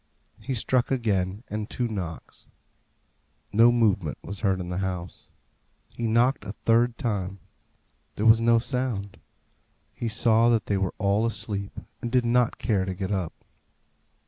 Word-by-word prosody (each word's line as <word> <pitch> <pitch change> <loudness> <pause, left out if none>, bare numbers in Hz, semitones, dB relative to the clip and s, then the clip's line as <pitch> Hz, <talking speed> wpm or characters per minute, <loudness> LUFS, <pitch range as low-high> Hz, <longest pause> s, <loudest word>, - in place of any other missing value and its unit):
He 135 - -3
struck 125 +2 +1
again, 105 -5 -1
and 105 +1 -4
two 125 - -1
knocks. 90 -7 -7 1.1
No 115 +3 +6
movement 105 - +1
was 100 -1 -6
heard 95 -3 +1
in 90 -1 -5
the 90 +1 -2
house. 90 -2 -5 0.6
He 115 - -4
knocked 120 +3 +2
a 100 -1 -6
third 115 +1 +3
time. 100 -4 -2 0.8
There 105 - -2
was 115 0 +6
no 115 0 +5
sound. 120 -5 -2 0.7
He 120 - -4
saw 115 +1 +3
that 115 -3 +2
they 100 - 0
were 95 -1 -1
all 100 +2 +1
asleep, 100 -3 -3 0.2
and 120 - -4
did 125 -1 +2
not 120 0 +2
care 100 -5 0
to 95 0 -4
get 95 +1 -4
up. 95 -5 -4
110 Hz, 150 wpm, -26 LUFS, 95-120 Hz, 1.1 s, No